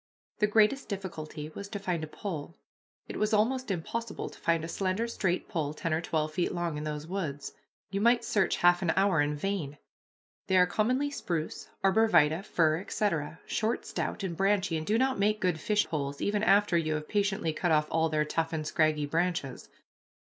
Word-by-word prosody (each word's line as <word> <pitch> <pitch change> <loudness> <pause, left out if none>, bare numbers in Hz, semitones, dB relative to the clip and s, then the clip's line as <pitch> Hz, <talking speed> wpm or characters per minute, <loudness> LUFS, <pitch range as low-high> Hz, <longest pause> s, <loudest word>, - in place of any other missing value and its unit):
The 210 - +4
greatest 215 +6 +3
difficulty 155 -6 -5
was 200 +5 -8
to 205 - -4
find 180 -5 -2
a - - -4
pole. 165 -1 -6 0.5
It - - -6
was 215 +1 +2
almost 255 +4 +1
impossible 210 +5 -3
to - - -15
find 165 -1 +1
a - - -3
slender, 190 +6 -1
straight 185 -6 -1
pole 155 -6 -2
ten 165 +1 -2
or 160 - +1
twelve 155 -2 -1
feet 175 - 0
long 170 -2 -2
in 150 +1 -4
those 150 0 -4
woods. 160 -6 -4 0.4
You 200 0 -1
might 235 +1 +4
search 210 -6 +2
half 175 0 +6
an 175 -3 +1
hour 195 -5 +3
in 145 0 0
vain. 150 -4 -3 0.7
They 190 - +3
are 180 - +7
commonly 250 +10 0
spruce, 165 - -4
arbor 220 +4 +4
vitæ, 160 0 +4
fir, 160 -5 +2
etc., 180 -6 -2
short, 225 +1 -1
stout, 210 - -3
and 180 -3 -3
branchy, 195 -1 +1
and 155 0 -3
do 215 - +3
not 260 -2 +1
make 210 +1 +2
good 180 -5 0
fishpoles, 155 -10 -1
even 205 0 0
after 205 -3 +4
you 155 -2 +1
have 150 0 -4
patiently 200 -5 0
cut 175 +2 0
off 150 -1 +4
all 160 0 +2
their 155 -1 +1
tough 165 +1 -1
and 155 -1 -2
scraggy 155 -1 +1
branches. 160 -4 -2
180 Hz, 195 wpm, -29 LUFS, 155-205 Hz, 0.7 s, are